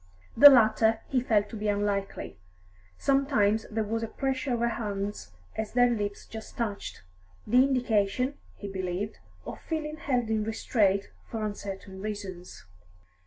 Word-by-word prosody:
The 290 - +11
latter 225 -3 +4
he 255 -2 +2
felt 210 -4 +2
to - - -8
be 210 0 -3
unlikely; 200 - -2 0.6
sometimes 245 -6 +2
there 220 0 -1
was 225 +2 -2
a 225 - -2
pressure 265 +3 -2
of - - -3
her 235 - +2
hands 205 - -4 0.2
as 220 -1 -4
their 245 0 +4
lips 205 -3 -3
just 220 -1 -10
touched, 205 - -4 0.4
the 250 +4 +5
indication, 250 -1 +1 0.2
he 205 - -7
believed, 190 +1 -4 0.3
of - - -7
feeling 310 -1 -4
held 245 -6 -1
in 215 -1 +1
restraint 210 -2 +1 0.2
for 220 -2 -3
uncertain 195 -2 -6
reasons. 195 - -7
220 Hz, 145 wpm, -28 LUFS, 205-245 Hz, 0.6 s, The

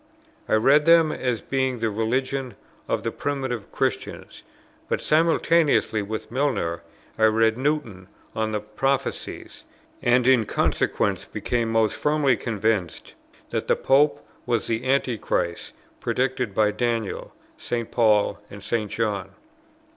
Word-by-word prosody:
I - - +4
read 140 +7 +4
them 165 -2 +6
as 125 -5 -2
being 130 -2 -1
the 115 -1 -1
religion 130 +4 -1 0.3
of - - -1
the - - -1
primitive 130 -6 -3
Christians: - - -3 0.5
but - - 0
simultaneously 160 -6 +2
with 110 +3 -5
Milner 125 -11 -1 0.4
I 110 - +5
read 110 0 +3
Newton 125 -9 -2 0.3
on 110 0 -1
the 105 -1 -2
Prophecies, 135 +6 -3 0.4
and 120 0 +3
in 125 -4 +4
consequence - - 0
became 120 -2 -2
most 110 -1 +2
firmly 150 -3 +2
convinced 110 -6 -2 0.4
that - - -2
the - - +3
Pope 145 +2 +2 0.2
was 120 -2 0
the 115 +3 -2
Antichrist 120 -9 -1 0.3
predicted 125 -5 -1
by 105 -1 +3
Daniel, 115 -2 -2 0.2
St. 120 -2 -3
Paul, 110 -3 +3
and 100 -1 -11
St. 110 -3 -1
John. 105 -4 -2
120 Hz, 125 wpm, -24 LUFS, 110-135 Hz, 0.5 s, them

